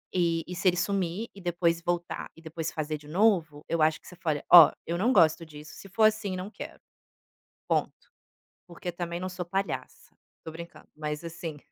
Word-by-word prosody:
E 170 -2 +1
e 180 - -6
se 175 +2 0
ele 180 -1 +4
sumir 190 +2 -1
e 195 - -12
depois 170 -1 +1
voltar, 175 0 -3
e 165 - -16
depois 160 0 -5
fazer 155 0 -3
de 145 - -16
novo, 165 -4 +2
eu 165 - 0
acho 155 0 +3
que - - -19
você 180 - -11
faria: 155 -4 -2
"Oh, 170 -4 +12 0.2
eu 170 - -2
não 225 +8 +2
gosto 160 -7 +4
disso. 150 -1 -12
Se 195 - -12
for 220 +4 +1
assim 215 -3 +3
não 185 +3 -6
quero, - - -9 0.9
ponto. - - -1 0.6
Porque 175 0 -6
também 170 0 -4
não 185 +1 -3
sou 180 -1 -5
palhaça". 195 +3 -4 0.3
Tô 160 - -7
brincando, 170 +1 -11
mas, 150 0 -4
assim, 165 -2 -6
170 Hz, 195 wpm, -28 LUFS, 160-185 Hz, 0.9 s, Oh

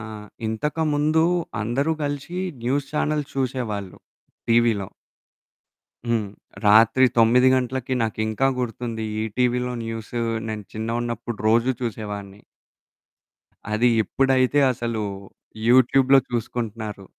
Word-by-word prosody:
ఆ! - - -7 0.4
ఇంతకముందు 150 +6 +1 0.4
అందరూ 135 +8 0
కలిసి 145 +5 -4 0.3
న్యూస్ 135 +3 0
ఛానెల్స్ 150 -1 -1
చూసేవాళ్ళు. 120 -7 -3 0.5
టీవీలో. 115 -4 +3 1.2
హ్మ్. 110 -4 0 0.3
రాత్రి 110 +5 +6
9 125 +3 +5
గంటలకి 130 0 -1
నాకింకా 110 +2 0
గుర్తుంది. 115 -2 -3 0.2
ఈటీవీలో 125 +3 0
న్యూసు 115 +1 -4 0.3
నేను 110 -1 -5
చిన్న‌గున్నప్పుడు 115 +1 -3
రోజు 115 +3 +3
చూసేవాడిని. 105 -3 -5 1.3
అది 115 +3 +3 0.2
ఎప్పుడైతే 135 +2 +2
అసలు 115 -2 -3 0.7
యూట్యూబ్‌లో 130 +2 +5
చూసుకుంటున్నారు. 110 -3 -4
120 Hz, 85 wpm, -23 LUFS, 110-130 Hz, 1.3 s, రాత్రి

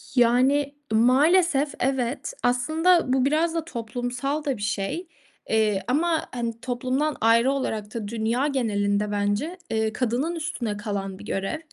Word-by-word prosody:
Yani, 265 +4 +3 0.2
maalesef 285 +6 +4
evet. 265 - -1
Aslında, 315 +5 +3
bu 260 -1 +2
biraz 320 +4 +1
da 325 - -1
toplumsal 245 +3 -3
da 275 -4 -1
bir 205 - -10
şey. 210 - -2 0.4
Eee, 215 -3 +2
ama, 320 +5 +1
hani, 235 -2 -4
toplumdan 260 +4 -1
ayrı 230 +3 +4
olarak 220 -6 -3
da 225 -3 -4
dünya 230 +5 0
genelinde 210 -6 0
bence, 205 - -1
eee, 220 -1 0
kadının 255 +8 -1
üstüne 285 -10 -3
kalan 200 -3 -4
bir 210 - -10
görev. 195 +10 -2
245 Hz, 140 wpm, -25 LUFS, 220-290 Hz, 0.4 s, maalesef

